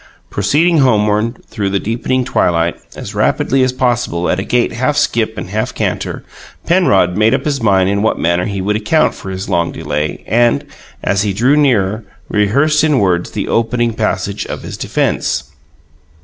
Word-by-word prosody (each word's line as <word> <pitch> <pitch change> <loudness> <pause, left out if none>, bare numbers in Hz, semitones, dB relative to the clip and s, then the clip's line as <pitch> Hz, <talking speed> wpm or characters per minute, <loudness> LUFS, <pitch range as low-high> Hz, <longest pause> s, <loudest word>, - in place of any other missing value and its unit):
Proceeding 155 - +2
homeward 110 -2 +1
through 100 -4 -3
the 100 0 0
deepening 125 +4 -1
twilight 85 -7 +1 0.2
as - - -7
rapidly 135 0 +1
as 130 0 +2
possible, 120 -9 0
at 90 - 0
a - - -2
gait 120 +2 +1
half 130 +5 0
skip 110 -1 0
and 95 - -6
half 110 +1 -2
canter, - - -3 0.4
Penrod 100 - +3
made 110 +4 +3
up - - -4
his 140 -4 -1
mind 95 -4 +3
in 100 +1 0
what 110 - +1
manner 85 +2 +1
he 100 -2 -3
would 105 +3 0
account 110 +9 +2
for 95 - -9
his 95 0 -5
long 85 -1 0
delay, 75 +1 -3
and, 120 +6 +2 0.4
as 100 0 +1
he 100 -1 -1
drew 125 +8 +3
nearer, 110 -8 +2 0.3
rehearsed 140 +10 +2
in 150 -3 +3
words 90 -5 +1
the - - -4
opening 115 0 0
passage 100 -2 -2
of - - -6
his - - -6
defence. - - -1
110 Hz, 175 wpm, -15 LUFS, 95-130 Hz, 0.4 s, Penrod